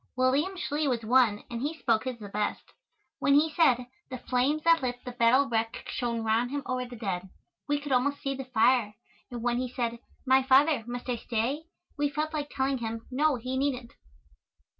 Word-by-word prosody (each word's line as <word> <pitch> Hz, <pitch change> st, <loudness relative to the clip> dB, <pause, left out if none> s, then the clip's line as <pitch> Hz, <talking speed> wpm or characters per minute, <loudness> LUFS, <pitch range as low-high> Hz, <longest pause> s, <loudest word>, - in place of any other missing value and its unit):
William 275 Hz, +9 st, +2 dB
Schley 300 Hz, -3 st, -1 dB
was 240 Hz, -4 st, 0 dB
one, 230 Hz, -3 st, +3 dB
and 235 Hz, 0 st, -4 dB
he 300 Hz, +4 st, -2 dB
spoke 230 Hz, -5 st, +1 dB
his 255 Hz, -2 st, -3 dB
the 210 Hz, -3 st, -9 dB
best. 205 Hz, +1 st, -2 dB, 0.6 s
When 280 Hz, -, +3 dB
he 310 Hz, +2 st, +4 dB
said, 255 Hz, -7 st, +3 dB, 0.2 s
"The 255 Hz, -, -5 dB
flames 260 Hz, +5 st, 0 dB
that 330 Hz, -1 st, +5 dB
lit 245 Hz, -1 st, -2 dB
the 250 Hz, -, -4 dB
battle 245 Hz, +3 st, +4 dB
wreck 225 Hz, 0 st, -2 dB
shone 235 Hz, -2 st, -2 dB
round 225 Hz, +2 st, +1 dB
him 285 Hz, +1 st, -3 dB
o'er 255 Hz, -1 st, -2 dB
the 245 Hz, -, -9 dB
dead," 190 Hz, -5 st, -4 dB, 0.4 s
we 290 Hz, 0 st, +2 dB
could 290 Hz, -1 st, -7 dB
almost 275 Hz, +3 st, +2 dB
see 275 Hz, -, -2 dB
the 270 Hz, 0 st, -6 dB
fire, 235 Hz, -3 st, +2 dB, 0.3 s
and 240 Hz, -2 st, -6 dB
when 240 Hz, 0 st, +1 dB
he 255 Hz, 0 st, -2 dB
said, 235 Hz, -2 st, -3 dB, 0.3 s
"My 265 Hz, 0 st, +5 dB
father, 270 Hz, 0 st, +4 dB
must 245 Hz, +1 st, -6 dB
I 245 Hz, -1 st, -1 dB
stay?" 245 Hz, +8 st, -2 dB, 0.3 s
we 290 Hz, 0 st, +2 dB
felt 305 Hz, +2 st, -3 dB
like 295 Hz, -1 st, -3 dB
telling 265 Hz, -1 st, -1 dB
him, 225 Hz, -1 st, -5 dB
no, 295 Hz, +3 st, +2 dB
he 255 Hz, +2 st, -4 dB
needn't. 260 Hz, -3 st, -2 dB
255 Hz, 200 wpm, -28 LUFS, 235-280 Hz, 0.6 s, that